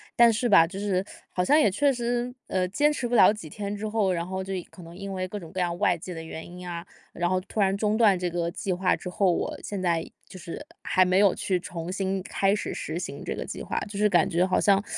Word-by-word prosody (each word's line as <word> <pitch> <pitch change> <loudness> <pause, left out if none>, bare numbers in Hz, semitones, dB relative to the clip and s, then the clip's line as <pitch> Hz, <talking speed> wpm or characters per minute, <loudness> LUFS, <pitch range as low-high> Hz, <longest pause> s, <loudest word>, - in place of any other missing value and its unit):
但 235 -1 +7
是 240 +3 0
吧， 165 -5 +7
就 190 +3 -7
是 195 -2 0 0.3
好 180 - 0
像 295 +10 +5
也 290 - +5
确 280 +9 +3
实 240 0 -1 0.2
呃 185 -1 0
坚 290 +11 +2
持 255 -4 -2
不 240 - -5
了 190 -4 +8
几 210 -6 -7
天 205 +4 -4
之 215 +2 -4
后， 210 -3 +1
然 170 -1 -2
后 190 0 -3
就 195 - -6 0.2
可 185 - -13
能 170 +1 -11
因 195 0 -6
为 185 -1 -2
各 205 +3 -6
种 165 -4 -11
各 190 - -4
样 175 -1 0
外 180 - +3
界 175 +2 -8
的 165 -2 -6
原 160 0 -7
因 180 +1 -9
啊， 170 -1 -5 0.3
然 175 0 0
后 185 0 +2
突 205 - -6
然 195 -1 +3
中 210 +1 +1
断 215 -4 +5
这 180 0 -2
个 170 0 -1
计 185 +2 -3
划 185 +1 +2
之 180 - -7
后， 190 0 +3
我 - - -1
现 205 - -4
在 170 -3 +1 0.2
就 185 - -11
是 170 - -7 0.2
还 185 0 +3
没 185 +1 +3
有 200 -2 +5
去 185 -2 0
重 170 0 -6
新 190 0 -1
开 195 +1 +1
始 205 - -3
实 - - -4
行 - - -5
这 - - -3
个 - - -5
计 - - -6
划， - - -4
就 200 -1 -6
是 210 0 +4
感 175 -2 +4
觉 175 -1 +2
好 185 -1 +1
像 200 -1 +4
190 Hz, 295 characters per minute, -26 LUFS, 180-205 Hz, 0.3 s, 了